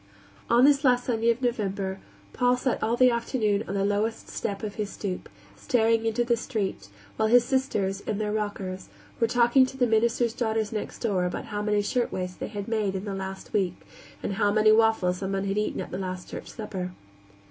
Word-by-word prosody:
On 240 +2 +6
this 285 0 +4
last 250 -2 +3
Sunday 230 -1 +1
of 235 +2 +1
November 195 -5 -1 0.3
Paul 250 0 +3
sat 255 0 -1
all 230 +2 +1
the 255 0 +6
afternoon 225 -3 0
on 200 - -3
the 195 0 +1
lowest 210 +3 -1
step 200 -1 -4
of 210 -2 -3
his 210 -1 -3
stoop, 190 -4 -5 0.3
staring 225 -2 +2
into 225 +2 +1
the 240 0 +2
street, 215 - -3 0.3
while 220 - +2
his 240 +1 +5
sisters, 205 -8 0
in 210 - -3
their 210 0 -1
rockers, 200 -3 -3 0.3
were 230 - +3
talking 240 +2 +5
to 265 - -9
the 250 - +3
minister's 230 +1 +2
daughters 220 -3 -1
next 215 -2 -4
door 195 -6 +1
about 180 - -3
how 205 - -1
many 210 0 +1
shirtwaists 185 -6 -2
they - - -4
had 205 -1 -6
made 215 -4 0
in 190 +2 -4
the 200 - -3
last 190 0 -6
week, 185 -4 +1 0.5
and - - -2
how 205 0 +2
many 215 +1 +5
waffles 215 -5 +3
someone 195 0 -2
had 200 +1 0
eaten 210 - -2
at - - -5
the 185 - -4
last 185 -1 -5
church - - -8
supper. 190 -5 -5
215 Hz, 200 wpm, -27 LUFS, 195-235 Hz, 0.5 s, On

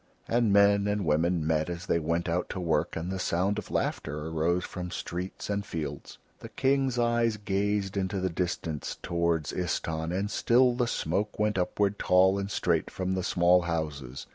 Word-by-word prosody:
And 115 -2 +2
men 100 0 +5
and 105 -2 0
women 80 +2 +1
met 80 0 +1
as 85 +1 -5
they 85 - +1
went 85 +2 -1
out 85 +1 -1
to - - -4
work 85 -3 0
and 85 +3 -3
the 95 - -3
sound 95 +4 0
of - - -9
laughter 75 +1 -2
arose 85 +3 0
from 90 0 -6
streets 90 +1 -5
and 100 0 -1
fields; 75 -7 -6 0.2
the - - -9
King's 135 -2 +1
eyes 120 -2 +2
gazed 100 -1 -1
into 95 0 -1
the 95 - 0
distance 85 -4 -3
toward 85 -2 +1
Istahn 80 0 -2
and 100 +3 -1
still 125 +2 +4
the 120 0 0
smoke 105 +1 -1
went 105 -2 +1
upward 100 +3 0
tall 95 +2 +4
and 100 0 -3
straight - - 0
from 95 0 -2
the 95 - -1
small 90 0 +4
houses. 75 -6 -4
90 Hz, 180 wpm, -28 LUFS, 85-100 Hz, 0.2 s, men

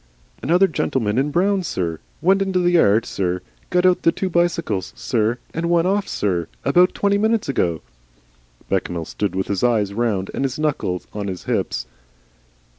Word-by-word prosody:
"Another 175 +7 +4
gentleman 125 - 0
in 140 +2 +1
brown, 190 +5 +2
sir. 85 - -3 0.2
Went 195 +3 +4
into 190 -1 0
the 175 -1 +3
yard, 110 - +4
sir, 90 -1 -2 0.3
got 180 0 +2
out 185 -1 +4
the 165 - +4
two 190 +1 -3
bicycles, 170 - 0
sir, 115 0 0 0.2
and 170 +1 -2
went 170 0 +3
off, 200 +2 +1
sir 90 -5 -1 0.2
about 180 +1 +4
twenty 200 0 +2
minutes 220 0 +1
ago." 85 - 0 0.9
Bechamel 90 -3 -1
stood 100 +3 -3
with 95 0 0
his 100 +1 -2
eyes 110 -5 +2
round 105 -4 -1
and - - -2
his 135 0 -2
knuckle 145 - -1
on 105 -1 -4
his 95 -2 -5
hips. - - -1
135 Hz, 170 wpm, -21 LUFS, -, 0.9 s, Another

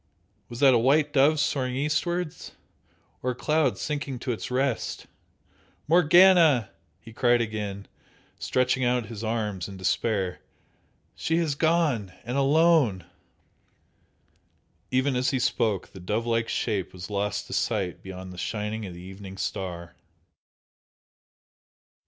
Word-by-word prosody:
Was 120 +2 -8
that 135 -2 +7
a 120 - +4
white 145 +5 +3
dove 145 +2 +4
soaring 130 -3 0
eastwards? 150 +4 -2 0.7
or 130 - -1
a 125 - -2
cloud 150 +2 +1
sinking 145 -3 -3
to 125 +1 -3
its 115 - -4
rest? 130 -1 -1 0.8
"Morgana!" 170 - +5 0.3
he 115 - -14
cried 120 0 +3
again, 105 -3 -4 0.5
stretching 130 0 +1
out 125 -1 +1
his 110 0 -7
arms 105 -5 -2
in 100 -1 -9
despair 95 0 -1 0.7
"She 160 - -1
has 165 -4 +1
gone! 145 - +1
And 125 - -4
alone!" 140 - +3 1.8
Even 130 +1 +1
as 125 +2 +1
he 135 - 0
spoke 115 -5 0
the 95 - -12
dove 105 +6 -2
like 115 -1 0
shape 100 -5 -2
was 95 +2 -8
lost 100 0 -2
to - - -8
sight 100 -6 -1
beyond 95 -1 -8
the 90 - -9
shining 105 +1 -3
of 90 - -9
the 90 - -10
evening 95 +1 -10
star. 90 -2 -5
120 Hz, 130 wpm, -26 LUFS, 100-140 Hz, 1.8 s, that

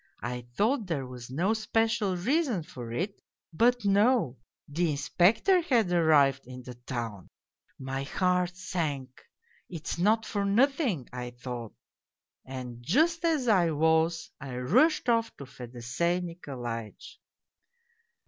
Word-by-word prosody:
I 120 0 -4
thought 225 0 +1
there 145 -6 -2
was 125 -1 -9
no 175 +11 +1
special 220 -3 0
reason 250 - +1
for 120 -6 -8
it 190 - -3 0.3
but 240 +5 +3
no, 200 - +3 0.3
the 165 +3 0
Inspector 190 - +3
had 235 - +2
arrived 145 -6 +4
in 125 0 -9
the 125 - -8
town. 120 -5 -6 0.5
My 135 0 -4
heart 180 +4 0
sank. 145 -8 -3 0.2
' 470 0 -32
It's 170 -1 -5
not 215 +4 +3
for 205 -2 -2
nothing,' 225 - +2
I 125 0 -5
thought. 120 -2 -7 0.7
And 125 -2 -7
just 320 - +2
as 315 -7 +1
I 185 -6 +4
was 160 +2 +1
I 135 -2 -6
rushed 250 - +3
off 230 -1 +1
to 140 - -8
Fedosey 125 +8 -2
Nikolaitch. 125 -10 -7
170 Hz, 130 wpm, -29 LUFS, -, 0.7 s, arrived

